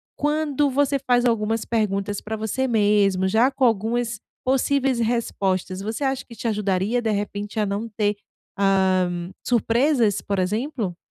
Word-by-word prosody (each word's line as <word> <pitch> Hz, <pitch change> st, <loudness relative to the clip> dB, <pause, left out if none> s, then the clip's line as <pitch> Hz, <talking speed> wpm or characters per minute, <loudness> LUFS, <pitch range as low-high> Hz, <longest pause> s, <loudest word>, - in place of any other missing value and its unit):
quando 295 Hz, -1 st, +1 dB
você 280 Hz, +1 st, +1 dB
faz 250 Hz, -2 st, +1 dB
algumas 225 Hz, -1 st, 0 dB
perguntas 205 Hz, -3 st, -1 dB
pra 220 Hz, +1 st, -5 dB
você 220 Hz, +5 st, -1 dB
mesmo, 205 Hz, -4 st, +3 dB
já 230 Hz, +7 st, +3 dB
com 265 Hz, -, +1 dB
algumas 230 Hz, +1 st, 0 dB, 0.2 s
possíveis 270 Hz, 0 st, +2 dB
respostas, 195 Hz, -5 st, -1 dB
você 220 Hz, +7 st, -3 dB
acha 270 Hz, 0 st, -1 dB
que 235 Hz, -, -13 dB
te 230 Hz, -, -4 dB
ajudaria, 210 Hz, +2 st, 0 dB
de 225 Hz, -, 0 dB
repente, 205 Hz, +1 st, -3 dB
a 210 Hz, -, +2 dB
não 205 Hz, +3 st, -3 dB
ter, 210 Hz, -1 st, 0 dB, 0.4 s
ah, 190 Hz, -2 st, +3 dB, 0.4 s
surpresas, 235 Hz, -1 st, +2 dB
por 200 Hz, -1 st, -2 dB
exemplo? 210 Hz, -, -2 dB
220 Hz, 145 wpm, -23 LUFS, 200-250 Hz, 0.4 s, mesmo